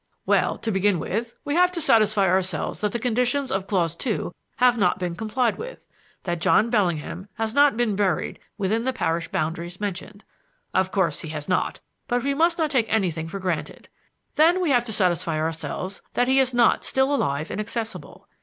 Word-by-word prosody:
"Well, - - +2
to 225 - -3
begin 195 -1 +2
with, 225 +8 -3
we 285 - -1
have 360 +2 +4
to 345 - -2
satisfy 215 -8 +4
ourselves 185 0 0
that 210 -1 0
the - - -1
conditions 250 +4 0
of 190 0 -1
clause 170 -5 0
two 210 -4 -3 0.2
have 250 -1 +4
not 190 -6 +2
been 180 -2 -3
complied 220 +4 -1
with: - - -8 0.4
that 175 -2 -3
John 220 +5 +3
Bellingham 180 -3 -1
has 225 0 -2
not 285 -3 +4
been 235 -4 +1
buried 195 -2 0 0.2
within 215 +3 0
the 260 +1 0
parish 170 -6 -1
boundaries 170 +3 -3
mentioned. 205 +1 -5 0.5
Of 185 0 +1
course 170 -7 0
he 160 - -7
has 150 -1 -5
not, 185 -1 0 0.3
but 245 -1 0
we 280 +1 +1
must 335 +4 +2
not 315 -3 0
take 240 -6 +1
anything 170 -7 0
for 170 - -5
granted. 180 -5 -4 0.5
Then 335 +4 +5
we 350 -5 +1
have 245 -2 +4
to 230 - -4
satisfy 175 -5 +1
ourselves 165 +4 -4
that 245 - +2
he 265 +1 +4
is 260 -1 +3
not 240 -2 +3
still 265 +2 +1
alive 155 - -1
and 215 - -2
accessible. 225 +1 -6
210 Hz, 190 wpm, -24 LUFS, 180-245 Hz, 0.5 s, Then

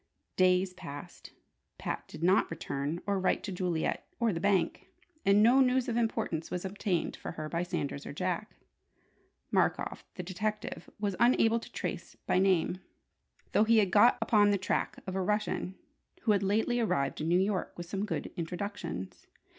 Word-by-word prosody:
Days 185 0 +3
passed. 170 -6 -9 0.5
Pat - - -4
did 165 - -9
not 185 +2 +4
return 145 0 -3
or 200 -1 +1
write 190 - +1
to 200 - -4
Juliet 180 -3 -1
or 230 -3 +2
the 165 - -2
bank. 195 -1 +1 0.4
And 200 +1 +6
no 245 +4 +6
news 255 -1 +3
of 235 - -1
importance 225 -8 -1
was 180 +1 -3
obtained 190 -3 -1
for - - -7
her 155 -1 -5
by 170 +2 -1
Sanders 145 -5 -3
or - - -5
Jack. 185 +7 -3 1.0
Markoff - - +1
the 180 - -5
detective 210 +4 -4
was 205 -2 -1
unable 235 -1 +4
to - - -12
trace - - -5
by - - +2
name, 185 -1 +2 0.7
though - - +4
he 225 +1 +4
had 200 -4 +3
got 210 +5 +6
upon 205 -2 +4
the 200 - +3
track 185 - -1
of 190 - -4
a 190 - 0
Russian 210 -1 -1 0.5
who 220 - +3
had 200 -2 +3
lately 220 +5 +1
arrived 140 -14 0
in 155 - -1
New 175 +2 +4
York 190 -1 0
with 175 - -5
some 195 +3 -3
good 210 - -3
introductions. 175 - -5
190 Hz, 170 wpm, -31 LUFS, 175-210 Hz, 1.0 s, And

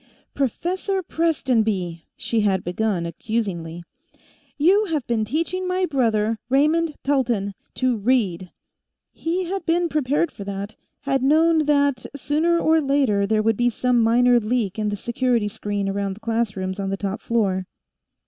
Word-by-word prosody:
"Professor 365 - -1
Prestonby," 220 - 0
she 230 - -1
had 195 -3 +1
begun, 180 -1 -1
accusingly, 175 -2 -3 0.7
"you 380 +8 +4
have 310 -9 -2
been 230 -2 0
teaching 335 - -2
my 365 0 +1
brother, 225 -7 +1
Raymond 305 +4 +2
Pelton, 240 -8 0 0.2
to 255 -2 +1
read!" 200 -6 0 0.6
He 345 +3 -2
had 375 +2 -3
been 340 +1 +2
prepared 295 +2 0
for 200 - -9
that; 200 +1 -5 0.3
had 270 -2 0
known 315 +2 +3
that 285 -4 +2
sooner 310 +5 +1
or 320 -1 +3
later 270 -8 +2
there 215 0 +1
would 225 -1 +2
be 245 0 +3
some 245 0 +1
minor 240 +2 +4
leak 220 -3 -1
in 210 -1 0
the 205 - -2
security 235 0 0
screen 205 -1 -3
around 195 0 -2
the - - -15
classrooms 205 -4 -2
on 195 -1 -2
the 195 - -2
top 195 0 -4
floor. 195 -5 0
235 Hz, 150 wpm, -22 LUFS, 205-295 Hz, 0.7 s, you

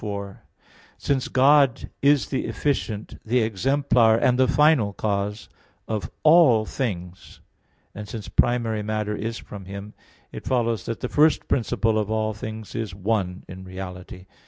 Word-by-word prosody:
4: 100 -2 -6 0.5
Since 135 -3 -1
God 135 -1 +3
is 140 0 +3
the 135 - -2
efficient, 110 -7 -3
the 120 +3 +1
exemplar 115 +1 +2
and 125 +2 +2
the 130 - +5
final 145 -8 +3
cause 105 +1 -2 0.4
of 110 -2 -3
all 155 -9 +6
things, 90 -8 -5 0.5
and 105 0 -8
since 110 -1 -7
primary 115 -3 +1
matter 105 0 -2
is 115 +2 -4
from 100 -2 -10
Him, 100 +2 -8 0.4
it - - -9
follows 115 -3 0
that 115 - -5
the 125 - -2
first 150 +4 +3
principle 115 -3 +1
of 105 -1 -2
all 110 0 0
things 110 0 -8
is 110 -5 -4
one 95 -2 -2
in 95 0 -9
reality. 90 -1 -9
110 Hz, 145 wpm, -24 LUFS, 100-125 Hz, 0.5 s, all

